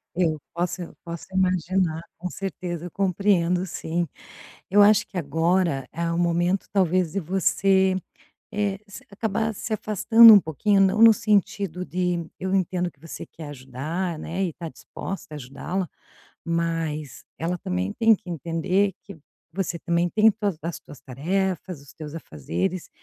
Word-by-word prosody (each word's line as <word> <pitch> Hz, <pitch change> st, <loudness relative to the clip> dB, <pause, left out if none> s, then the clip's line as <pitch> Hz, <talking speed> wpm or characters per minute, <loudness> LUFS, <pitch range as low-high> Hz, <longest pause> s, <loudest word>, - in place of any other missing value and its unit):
eu 170 Hz, -3 st, +1 dB, 0.2 s
posso, 175 Hz, 0 st, -3 dB
posso 170 Hz, -1 st, -7 dB
imaginar, 185 Hz, -2 st, +1 dB, 0.2 s
com 180 Hz, -, -4 dB
certeza, 180 Hz, -3 st, -5 dB
eu 175 Hz, -, -7 dB
compreendo, 185 Hz, -1 st, +1 dB
sim. 170 Hz, -1 st, -2 dB, 0.6 s
Eu 205 Hz, +2 st, +6 dB
acho 210 Hz, 0 st, +6 dB
que 195 Hz, -, -8 dB
agora 165 Hz, -1 st, +1 dB
é 170 Hz, 0 st, -2 dB
o 170 Hz, -, -1 dB
momento 175 Hz, +2 st, +1 dB
talvez 185 Hz, -3 st, +2 dB
de 200 Hz, -, 0 dB
você, 190 Hz, +1 st, +2 dB, 0.6 s
eh, 205 Hz, -2 st, -1 dB
você 200 Hz, -, -11 dB
acabar 220 Hz, +2 st, -1 dB
se 220 Hz, +2 st, -4 dB
afastando 225 Hz, +2 st, +7 dB
um 205 Hz, -, +9 dB
pouquinho, 195 Hz, +5 st, +1 dB
não 195 Hz, +3 st, +3 dB
no 230 Hz, -1 st, +10 dB
sentido 200 Hz, -5 st, 0 dB
de 180 Hz, -2 st, -1 dB
eu 190 Hz, +1 st, -2 dB
entendo 180 Hz, -1 st, 0 dB
que 140 Hz, -, -34 dB
você 165 Hz, +2 st, -8 dB
quer 155 Hz, -3 st, -10 dB
ajudar, 145 Hz, +6 st, -4 dB
né, 175 Hz, +5 st, -3 dB
e 185 Hz, -, 0 dB
está 165 Hz, +1 st, -7 dB
disposta 190 Hz, 0 st, -8 dB
a -, -, -5 dB
ajudá-la, 150 Hz, +7 st, -4 dB, 0.5 s
mas 165 Hz, -4 st, -2 dB
ela 170 Hz, +2 st, -2 dB
também 90 Hz, -, -2 dB
tem 225 Hz, -1 st, +5 dB
que 200 Hz, -2 st, -13 dB
entender 175 Hz, +4 st, 0 dB
que 200 Hz, -3 st, -11 dB, 0.3 s
você 175 Hz, -1 st, -3 dB
também 170 Hz, 0 st, +1 dB
tem 220 Hz, +4 st, +5 dB
tuas 205 Hz, -5 st, -2 dB
as 170 Hz, +2 st, -4 dB
tuas 145 Hz, -, -14 dB
tarefas, 180 Hz, +4 st, -2 dB
os 140 Hz, -, -16 dB
teus 155 Hz, -2 st, -8 dB
afazeres. 160 Hz, -, -4 dB
180 Hz, 155 wpm, -24 LUFS, 165-195 Hz, 0.6 s, no